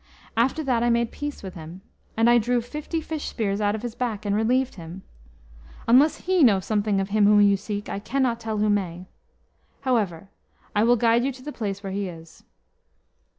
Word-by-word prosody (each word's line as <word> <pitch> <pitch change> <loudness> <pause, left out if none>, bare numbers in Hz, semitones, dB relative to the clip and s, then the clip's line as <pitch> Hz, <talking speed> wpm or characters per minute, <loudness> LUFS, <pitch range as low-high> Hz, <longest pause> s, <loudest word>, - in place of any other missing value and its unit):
After 255 +7 +1
that 250 -4 +1
I 240 - +2
made 235 0 +1
peace 290 -5 -6
with 190 -2 -7
him. 165 +3 -10 0.4
And 225 +1 +4
I 240 0 +6
drew 240 +2 +1
fifty 300 +7 -4
fish 315 -1 -5
spears 205 -2 -2
out 205 0 +1
of 220 - -7
his 240 -2 -4
back, 220 -4 -3
and 200 0 +1
relieved 250 +4 +1
him. 175 +1 -10 0.8
Unless 265 +7 +4
he 370 -1 +2
know 215 -8 +6
something 205 +1 0
of 195 +1 -2
him 210 0 +3
whom 210 0 +6
you 200 -1 +5
seek, 205 +1 -5
I - - -4
cannot 245 +1 0
tell 220 -2 -3
who 210 0 +1
may. 180 -3 -2 0.8
However, 200 -9 -1 0.5
I 210 +2 +3
will 240 +1 +5
guide 235 +1 +3
you 275 - 0
to 255 0 -14
the 295 - -6
place 200 -3 -4
where 195 -1 -5
he 200 -1 -2
is." 165 -1 -13
220 Hz, 200 wpm, -24 LUFS, 200-245 Hz, 0.8 s, I